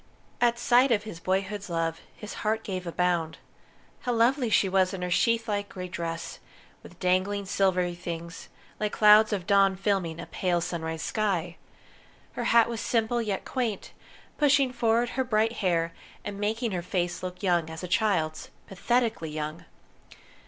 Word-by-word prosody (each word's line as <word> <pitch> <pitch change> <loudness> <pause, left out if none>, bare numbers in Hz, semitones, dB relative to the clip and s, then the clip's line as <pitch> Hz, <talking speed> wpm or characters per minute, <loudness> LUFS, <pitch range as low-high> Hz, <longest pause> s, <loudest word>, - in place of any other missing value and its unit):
At 240 -1 +3
sight 245 +2 +4
of 210 -3 +2
his 210 -6 -8
boyhood's 195 +2 -2
love, 165 -1 -2
his 210 - -8
heart 220 +1 0
gave 185 -2 -4
a - - -3
bound. 175 -2 0 0.6
How 245 - -2
lovely 240 +2 +2
she 205 - +3
was 190 0 +2
in 180 - -5
her 180 - -3
sheathlike 220 -1 +1
grey 180 -1 -6
dress, 165 -1 -5 0.4
with - - -15
dangling 190 +2 +1
silvery 185 -2 +1
things, 170 -1 -7 0.3
like 210 -1 -1
clouds 215 +1 +6
of 195 -4 -2
dawn 195 -1 +4
filming 190 -4 -1
a - - -6
pale 180 -2 0
sunrise 160 -1 -4
sky! 180 -6 -1 0.8
Her - - -4
hat 235 -1 +5
was 235 -1 -4
simple 235 0 0
yet 205 -4 -3
quaint, 235 -6 -3 0.5
pushing 280 -3 +3
forward 235 0 +2
her 260 - -1
bright 225 -1 +1
hair, 170 -4 0 0.3
and 200 -1 -5
making 220 +3 -1
her 180 -2 -2
face 175 0 -2
look 180 +1 -7
young 175 -4 +1
as 160 +2 -8
a - - -3
child's 180 -6 0 0.2
pathetically 225 -3 0
young. 155 +1 -5
195 Hz, 160 wpm, -27 LUFS, 175-225 Hz, 0.8 s, clouds